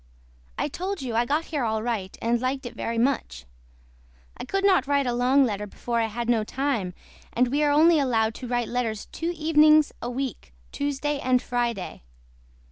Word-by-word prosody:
I - - 0
TOLD 375 -3 -4
YOU 245 -3 -4
I 235 +1 +2
GOT 300 +6 0
HERE 295 -5 -2
ALL 220 -1 -1
RIGHT 215 -6 -3
AND 235 +1 +1
LIKED 265 +1 -2
IT 240 - -6
VERY 230 0 -3
MUCH. 240 - -1 0.9
I - - -7
COULD 390 +8 -1
NOT 370 -10 +4
WRITE 280 -1 +2
A 245 - 0
LONG 255 +3 +4
LETTER 210 -3 -3
BEFORE 235 +3 -3
I 225 - +1
HAD 235 +2 -4
NO 230 -3 +2
TIME 230 -7 -2 0.4
AND 250 +1 +2
WE 285 +4 0
ARE 295 - +3
ONLY 315 +2 +5
ALOWED 225 -5 +1
TO 250 - -8
WRITE 240 -1 -1
LETTERS 230 -4 -2
TWO 335 - -3
EVENINGS 310 -1 +5
A 240 - -3
WEEK 245 - -5 0.2
TUESDAY 285 +1 -2
AND 255 -1 +2
FRIDAY. 235 -6 -2
250 Hz, 190 wpm, -25 LUFS, 230-285 Hz, 0.9 s, ONLY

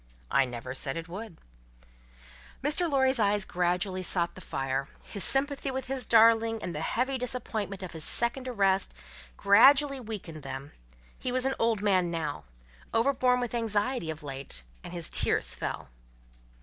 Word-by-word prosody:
"I 135 - +4
never 125 +1 -6
said 135 +2 -2
it 165 0 -6
would." 190 0 -8 1.3
Mr. 305 +4 +1
Lorry's 265 -2 +2
eyes 205 -1 +2
gradually 180 +1 -1
sought 170 -1 0
the 185 - -12
fire; 135 -3 -3 0.2
his 200 - -1
sympathy 275 0 +2
with 265 0 -4
his 260 -2 -2
darling, 225 0 +5
and 175 - -4
the 150 - -4
heavy 260 +9 -1
disappointment 220 -6 -3
of 185 - -6
his 160 -2 -4
second 240 +6 +3
arrest, 195 -5 +1 0.4
gradually 270 +7 +5
weakened 205 -9 -7
them; 135 +1 -7 0.5
he 255 - -3
was 255 +1 0
an 270 - +1
old 225 -3 +1
man 185 -4 +2
now, 155 - -4 0.5
overborne 250 +1 +2
with 245 -1 -3
anxiety 225 -3 -1
of 155 0 -6
late, 135 - -4 0.2
and - - -8
his 170 -2 -1
tears - - +1
fell. - - -5
205 Hz, 155 wpm, -28 LUFS, 170-250 Hz, 1.3 s, darling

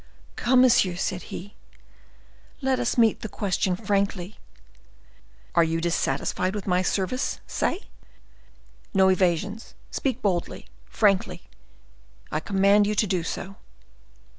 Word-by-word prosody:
"Come, 250 +1 +4
monsieur," 240 -8 +4
said 180 0 -2
he, 205 +4 -8 1.1
"let 265 -2 0
us 245 0 -1
meet 225 -2 +4
the 220 - -5
question 190 -2 -1
frankly. 200 -1 -2 1.1
Are 170 - +5
you 165 0 0
dissatisfied 170 +3 -1
with 205 - -4
my 180 -1 +2
service, 195 +7 -1
say? 365 - -1 1.1
No 190 0 +5
evasions; 190 +3 0 0.2
speak 260 -2 -2
boldly, 180 -4 -1 0.2
frankly—I 65 - -3
command 200 +3 +3
you 210 - 0
to 215 - +2
do 185 -3 0
so." 195 +4 -6
195 Hz, 115 wpm, -25 LUFS, 175-215 Hz, 1.1 s, Are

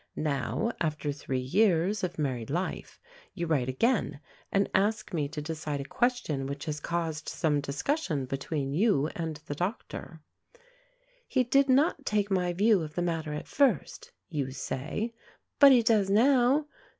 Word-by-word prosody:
Now, 155 - -1
after 150 -2 -1
three 135 -2 -3
years 185 +6 +2
of 180 -1 -2
married 130 -7 -2
life, 175 +6 -3 0.4
you 170 - -2
write 140 -6 +1
again 150 - +1 0.3
and 195 0 +2
ask 215 +2 +1
me 150 -4 0
to 150 +1 -6
decide 155 -2 -4
a - - -3
question 200 - -1
which 140 +2 -5
has 150 -2 -3
caused 160 -2 -3
some 150 -3 0
discussion 145 - -1
between 135 +1 -3
you 160 -5 +2
and 165 -2 -3
the 145 - -4
doctor. 175 - -5 1.0
"He 260 - +2
did 275 +3 +3
not 280 +2 +3
take 210 -4 0
my 180 -2 +1
view 205 +2 +3
of 155 -1 -6
the 175 - 0
matter 165 -3 -2
at 150 - -5
first," 265 - 0 0.2
you 145 -5 -2
say, 145 - -4 0.5
"but 280 -1 +9
he 245 -3 +6
does 215 -4 +3
now. 255 +6 +4
170 Hz, 155 wpm, -29 LUFS, 145-220 Hz, 1.0 s, but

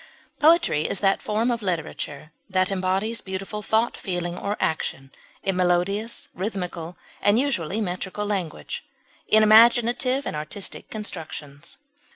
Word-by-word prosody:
Poetry 315 - +4
is - - 0
that 195 -1 +3
form 220 +3 0
of 235 -1 -1
literature 160 -5 -4 0.2
that 185 0 +2
embodies 195 +4 0
beautiful 195 +2 -5
thought, 220 +3 +1
feeling, 175 -2 -3
or 200 +3 -3
action 135 -3 -2 0.3
in 195 - 0
melodious, 185 +5 0
rhythmical, 180 -4 -4 0.2
and 205 +2 +4
(usually) 220 - 0
metrical 190 +1 -3
language, 190 -6 -3 0.4
in 220 0 +5
imaginative 240 +4 +5
and - - -3
artistic 155 +6 -5
constructions. 155 -9 -6
195 Hz, 125 wpm, -24 LUFS, 175-220 Hz, 0.4 s, in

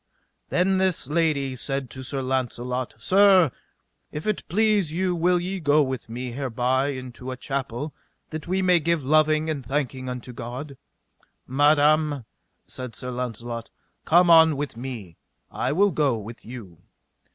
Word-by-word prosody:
Then 190 +1 +2
this 185 -7 0
lady 150 -5 +1
said 135 0 -3
to 130 - -7
Sir 135 +1 -4
Launcelot: 125 -2 -2
Sir, 185 - +5 0.6
if 150 - -6
it 215 -2 0
please 210 -3 +2
you 180 +2 0
will 175 +1 +2
ye 185 +2 -3
go 150 -2 +4
with 130 -4 -4
me 125 +2 -5
hereby 130 +1 0
into 130 -2 -6
a 130 - -5
chapel 135 +1 -4 0.4
that 155 0 -6
we 190 +2 0
may 180 -2 +5
give 165 -2 0
loving 155 +2 +3
and 150 -4 -2
thanking 130 -1 -2
unto 125 0 -6
God? 125 +5 -7 0.7
Madam, 145 0 +3 0.4
said 125 -4 -7
Sir 125 +3 -5
Launcelot, 120 -1 -4 0.3
come 175 +1 +5
on 160 -3 +7
with 145 -3 -4
me, 115 -9 -7 0.3
I 125 - -1
will 200 +6 +3
go 140 -8 +1
with 110 +2 -9
you. 110 -8 -10
140 Hz, 150 wpm, -25 LUFS, 125-160 Hz, 0.7 s, on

